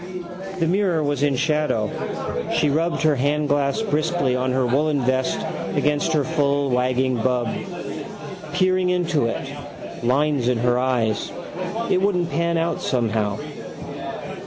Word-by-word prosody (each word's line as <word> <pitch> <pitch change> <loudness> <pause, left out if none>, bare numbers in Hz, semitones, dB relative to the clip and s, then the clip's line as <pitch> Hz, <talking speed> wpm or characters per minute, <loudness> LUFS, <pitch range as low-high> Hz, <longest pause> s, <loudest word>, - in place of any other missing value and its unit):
The 165 - +1
mirror 180 -2 +2
was 145 -1 0
in 145 -2 +3
shadow. 150 -7 +1 0.7
She 150 - +3
rubbed 165 +4 +1
her 155 -3 +4
handglass 145 +5 +1
briskly 155 -7 +1
on 130 0 0
her 130 0 +2
woollen 145 +3 +2
vest 130 +1 +1 0.4
against 150 +2 +2
her 150 -2 +3
full 140 -3 +1
wagging 125 0 +2
bub. 125 0 +1 1.0
Peering 185 0 +2
into 175 -8 +1
it. 115 - -3 0.6
Lines 135 +1 +2
in 125 -1 +3
her 120 +1 +2
eyes. 120 -5 0 0.6
It 185 - +3
wouldn't 180 -4 +1
pan 170 0 +1
out 165 +1 0
somehow. 110 -4 0
145 Hz, 130 wpm, -23 LUFS, 125-165 Hz, 1.0 s, her